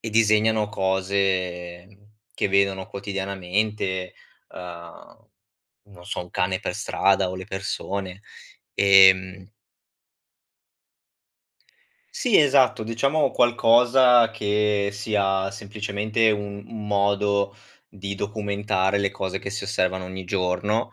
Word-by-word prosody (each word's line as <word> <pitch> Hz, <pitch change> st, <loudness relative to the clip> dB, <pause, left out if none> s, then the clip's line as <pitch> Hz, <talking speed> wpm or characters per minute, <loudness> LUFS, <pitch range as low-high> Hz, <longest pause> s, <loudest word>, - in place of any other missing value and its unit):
e 110 Hz, -, -6 dB
disegnano 110 Hz, -1 st, +2 dB
cose 95 Hz, -2 st, -2 dB, 0.5 s
che -, -, 0 dB
vedono 95 Hz, -1 st, +1 dB
quotidianamente: 95 Hz, -1 st, -3 dB, 0.4 s
uhm, 85 Hz, -2 st, -11 dB, 0.6 s
non 95 Hz, -4 st, -17 dB
so, -, -, -4 dB
un 90 Hz, -, -13 dB
cane 95 Hz, 0 st, -1 dB
per -, -, -4 dB
strada 95 Hz, -1 st, +1 dB
o 95 Hz, -, -5 dB
le 95 Hz, 0 st, -8 dB
persone. 95 Hz, 0 st, -5 dB, 0.5 s
Ehm 95 Hz, 0 st, +5 dB, 2.6 s
Sì, 250 Hz, -, +1 dB
esatto, 135 Hz, -6 st, +3 dB
diciamo 135 Hz, +7 st, 0 dB
qualcosa 120 Hz, 0 st, +4 dB
che 105 Hz, -2 st, 0 dB
sia 100 Hz, -2 st, -1 dB
semplicemente 105 Hz, +2 st, -1 dB
u 105 Hz, -, 0 dB
un 105 Hz, +1 st, -8 dB
modo 100 Hz, 0 st, 0 dB, 0.3 s
di 100 Hz, -1 st, -7 dB
documentare 100 Hz, -1 st, -1 dB
le 100 Hz, -1 st, 0 dB
cose 95 Hz, -1 st, -4 dB
che 100 Hz, -, -7 dB
si 105 Hz, +1 st, -5 dB
osservano 95 Hz, -2 st, -1 dB
ogni 95 Hz, 0 st, -7 dB
giorno; 100 Hz, +4 st, -1 dB
100 Hz, 105 wpm, -23 LUFS, 95-105 Hz, 2.6 s, Ehm